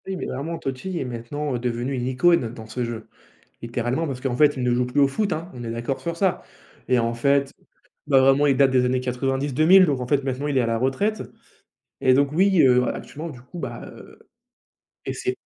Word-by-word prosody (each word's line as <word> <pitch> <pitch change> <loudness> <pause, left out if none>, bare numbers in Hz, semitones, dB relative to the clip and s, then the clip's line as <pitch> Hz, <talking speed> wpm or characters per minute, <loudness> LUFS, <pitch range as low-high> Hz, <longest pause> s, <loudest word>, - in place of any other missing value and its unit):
Oui 190 - -3
mais - - -5
vraiment 160 +6 -4
Totti 135 +8 -5
est - - -3
maintenant 125 +4 -4
devenu 120 +2 -2
une 125 -1 -2
icône 130 -1 +2
dans 110 -2 -10
ce 115 +3 -4
jeu, 115 -2 -6 0.5
littéralement, 120 +6 -2
parce 135 -3 -5
qu'en 130 -2 -2
fait, 145 +2 +4
il 130 - -2
ne 125 0 +2
joue 125 +1 +1
plus 125 +4 -1
au 140 - +6
foot, 200 +9 -2
hein, 165 +3 -6
on 120 - -8
est 115 - -5
d'accord 120 +4 -3
sur 170 0 -4
ça? 190 -1 +1 0.5
Et 125 - +3
en 115 0 0
fait, 140 +3 +1 0.5
ben 135 -2 +5
vraiment 135 +2 +4
il 135 -2 +2
date 135 -1 +4
des 130 -1 +3
années 130 +1 +1
90-2000, 135 +8 +3
donc 140 -6 -1
en 125 - -4
fait, 140 +1 +1
maintenant 135 +2 -3
il 140 -2 0
est - - +4
à - - 0
la 115 0 0
retraite 200 - 0 0.8
et 130 -1 +4
donc 140 +1 +2
oui, 190 +1 +4
heu, 125 -1 +4
actuellement 160 +3 -7
du 125 -5 -12
coup, 130 +8 -11
bah, - - -6
heu - - -14 0.9
et - - -2
c'est 380 0 -3
135 Hz, 225 wpm, -23 LUFS, 125-150 Hz, 0.9 s, au